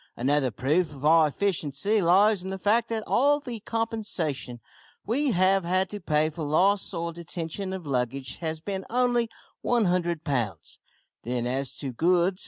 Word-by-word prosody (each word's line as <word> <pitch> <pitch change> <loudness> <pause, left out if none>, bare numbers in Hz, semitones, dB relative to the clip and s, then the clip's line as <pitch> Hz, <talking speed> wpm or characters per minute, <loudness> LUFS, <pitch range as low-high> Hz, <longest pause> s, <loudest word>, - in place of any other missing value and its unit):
Another 135 +2 +2
proof 150 - 0
of 140 +1 -7
our 160 0 +6
efficiency 190 +3 0
lies 195 +3 +4
in 190 - -6
the 190 - -4
fact 220 +4 +2
that 225 -1 -2
all 290 +3 +3
the 245 -6 -6
compensation 205 - -3 0.5
we 275 +6 +1
have 190 -2 +3
had 185 +2 +1
to 205 - -5
pay 155 -4 +1
for 160 - -8
loss 185 +7 +2
or 170 -2 -3
detention 170 +3 -5
of 190 -3 -6
luggage 130 -1 -2
has 160 -1 -3
been 190 +3 -4
only 240 -1 +2 0.3
100 180 -8 +1
pounds. 115 - -3 0.4
Then 120 0 -2
as 130 +2 -2
to 135 -3 -4
goods. 180 +7 +2
175 Hz, 160 wpm, -26 LUFS, 145-205 Hz, 0.5 s, our